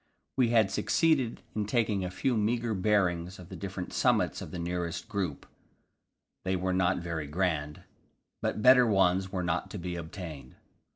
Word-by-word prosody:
We 125 -3 +3
had 110 -4 +4
succeeded 145 -5 +1
in 105 -2 -2
taking 105 -4 +1
a 90 - -2
few 125 +7 0
meagre 115 +2 0
bearings 95 -3 +1
of 90 -2 -12
the - - -7
different 95 -2 -6
summits - - +2
of - - -7
the 90 - -6
nearest 85 +1 -3
group; 95 -10 -3 1.0
they 95 0 0
were 95 0 -1
not 90 0 +2
very 85 -4 -4
grand, 75 -2 -1 0.6
but 105 - -2
better 125 -1 +7
ones 95 -2 +2
were 95 -2 -2
not 85 -1 -1
to 105 - -6
be 90 -1 -4
obtained. 80 -5 -8
95 Hz, 165 wpm, -30 LUFS, 85-105 Hz, 1.0 s, better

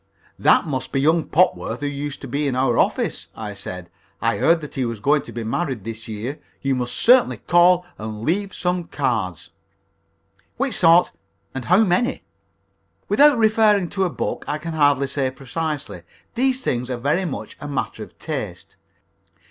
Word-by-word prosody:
"That - - +4
must 135 -5 -3
be 135 - 0
young 160 +4 +3
Popworth 180 -3 +1
who - - -2
used 145 0 -4
to 135 - -7
be 140 +3 -1
in 130 - -1
our 130 -2 +2
office," - - 0
I 105 -2 -6
said. 90 -3 -7 0.3
"I - - 0
heard 165 +1 +4
that 150 - -8
he 135 - -1
was 115 -3 -3
going 145 +6 +2
to - - -11
be 120 - -5
married 125 - -2
this 115 0 -7
year. 115 +6 -5 0.2
You 135 -1 +1
must 125 -1 -2
certainly 250 +1 +4
call 175 +1 +4
and 110 0 -6
leave 195 - 0 0.4
cards." 105 - -2 1.1
"Which - - -1
sort, 165 +2 +5 0.4
and 130 -2 -5
how 185 +6 +5
many?" 220 +7 +1 0.9
"Without 290 -2 +6
referring 215 -4 +3
to 195 - -1
a - - 0
book, - - -3
I 150 - -1
can 165 +2 -6
hardly 145 -3 +3
say 135 -1 -1
precisely. 145 +3 -5 0.3
These 260 +1 +1
things 125 - -1
are 125 - -2
very 150 +9 0
much 160 - -6
a 145 - -5
matter 140 -2 -3
of - - -10
taste. - - -6
145 Hz, 170 wpm, -22 LUFS, 125-175 Hz, 1.1 s, Without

